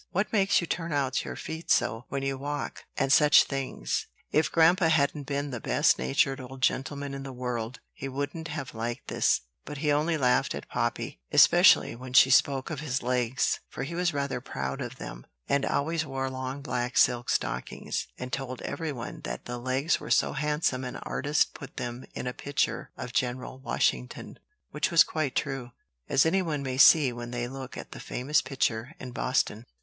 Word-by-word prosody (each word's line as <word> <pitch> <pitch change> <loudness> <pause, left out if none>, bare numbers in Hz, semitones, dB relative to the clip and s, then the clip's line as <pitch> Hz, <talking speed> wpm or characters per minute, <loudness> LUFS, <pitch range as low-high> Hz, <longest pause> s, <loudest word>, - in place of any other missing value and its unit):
"What 200 +5 -1
makes 195 -2 +4
you 170 - -2
turn 165 0 -3
out 140 -2 0
your - - -6
feet 160 +1 -7
so, 115 +3 +2
when 140 -1 -3
you 135 0 -1
walk?" 145 +2 -5
and 135 -1 +3
such 150 0 +7
things. 135 - -3 0.2
If 155 - +2
grandpa 165 +2 +5
hadn't 145 -2 +1
been 140 0 -2
the 120 - -4
best - - +2
natured 100 - +1
old 130 +1 -9
gentleman 140 +1 0
in 135 - -5
the 135 0 -7
world, 125 -1 -4
he 135 - -6
wouldn't 145 +4 -4
have 150 -4 -5
liked 115 +1 -4
this: - - +2 0.2
but 150 - -7
he 150 +1 +1
only 155 +3 +2
laughed 125 -3 +2
at - - -7
Poppy, - - -2
especially - - +6
when 125 +1 -9
she 130 +1 +7
spoke 135 +3 +3
of 155 - -3
his 135 -5 -2
legs; 125 0 +1
for - - -5
he 140 - -5
was 175 0 +1
rather 140 -3 -2
proud 65 - -4
of - - -5
them, - - -9 0.2
and 140 0 +1
always 160 +3 0
wore 135 -3 -3
long 130 +1 -5
black 125 -3 -2
silk 120 0 +3
stockings, - - -2
and 125 0 -7
told 130 -2 -4
every 160 -2 -3
one 120 -4 -6
that - - -6
the 120 0 -5
legs 130 +5 0
were - - -8
so - - +3
handsome 150 -2 0
an 125 - -5
artist 145 +1 0
put 135 -1 -11
them 120 +1 -5
in - - -4
a 125 - -2
picture 140 +2 -1
of 125 -1 -6
General 125 +2 -2
Washington; 65 - -1 0.3
which - - 0
was - - +7
quite 155 -4 -2
true, 135 -4 -2 0.4
as 135 +2 +4
any 190 +4 +3
one 150 -5 -2
may 130 -1 -3
see 145 -4 +7
when 120 0 -6
they 120 0 -3
look 130 0 -8
at - - -8
the - - -8
famous 140 +5 0
picture 125 +1 -2
in 125 - -7
Boston. 120 -3 -1
135 Hz, 195 wpm, -28 LUFS, 125-145 Hz, 0.4 s, such